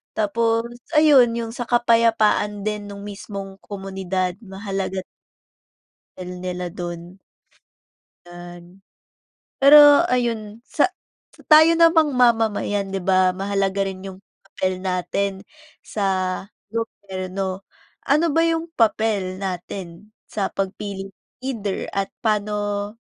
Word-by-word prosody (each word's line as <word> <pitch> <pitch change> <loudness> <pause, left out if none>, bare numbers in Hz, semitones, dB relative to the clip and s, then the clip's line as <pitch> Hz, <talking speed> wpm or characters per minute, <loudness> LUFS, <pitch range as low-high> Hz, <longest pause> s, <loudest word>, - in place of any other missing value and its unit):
Tapos 230 +2 +1 0.3
ayun, 285 -6 +6
'yong 230 -1 -4
sa 245 - -5
kapayapaan 230 -3 +2
din 210 -1 -3
nung 200 0 -9
mismong 195 -1 -7
komunidad, 190 -2 -3
mahalaga 195 -1 -4
din - - -66 1.0
papel 180 -1 -7
nila 180 -1 -4
dun. 175 0 -7 1.1
'Yan. 175 +2 -12 0.8
Pero 290 +3 +8
ayun, 230 -3 -1
sa 295 - +1 0.6
tayo 315 +1 +8
namang 325 -3 +5
mamamayan, 220 -5 +1
'di 195 - -2
ba, 185 0 +3
mahalaga 195 +1 -1
rin 190 0 -8
yung 190 -1 -8 0.3
papel 185 -1 -3
natin 185 +2 -1 0.5
sa 210 - -4 0.7
gobyerno. 195 -3 -5 0.4
Ano 305 +3 +2
ba 330 - +4
yung 330 0 0
papel 210 -4 +1
natin 185 +1 -6 0.2
sa 200 -2 -2
pagpili 195 0 -4 0.3
either 215 -7 -3
at 195 -1 -2
paano 205 -1 -1
200 Hz, 105 wpm, -22 LUFS, 190-230 Hz, 1.1 s, Pero